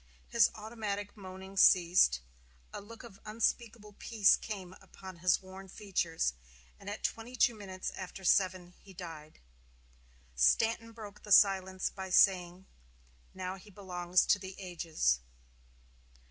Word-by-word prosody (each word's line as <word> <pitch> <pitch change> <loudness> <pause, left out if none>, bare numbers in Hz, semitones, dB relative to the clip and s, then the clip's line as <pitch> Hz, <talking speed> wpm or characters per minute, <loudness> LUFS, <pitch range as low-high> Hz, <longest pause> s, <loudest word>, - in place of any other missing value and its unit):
His 230 -3 +4
automatic 210 -2 -5
moaning 190 -1 -10
ceased, 175 - +5 0.5
a - - -6
look 230 +4 -12
of 220 -5 -13
unspeakable 220 0 -2
peace 215 -4 +4
came 190 -4 -7
upon 190 -2 -12
his 180 +2 +2
worn 190 +1 -11
features, 175 - -2 0.5
and 200 - -8
at 205 - -6
twenty 230 +3 -3
two 245 -1 +3
minutes 190 -3 -6
after 190 0 -8
seven 185 -1 +2
he 195 -2 -16
died. 165 -4 -10 0.9
Stanton 225 - +2
broke 215 -3 -11
the 210 - -10
silence 190 -1 +4
by 190 -1 -7
saying: 185 -1 +3 0.7
"Now 185 0 -5
he 200 +3 -16
belongs 180 -2 0
to 205 - +3
the 190 0 -8
ages." 165 - -1
190 Hz, 130 wpm, -32 LUFS, 180-210 Hz, 0.9 s, ceased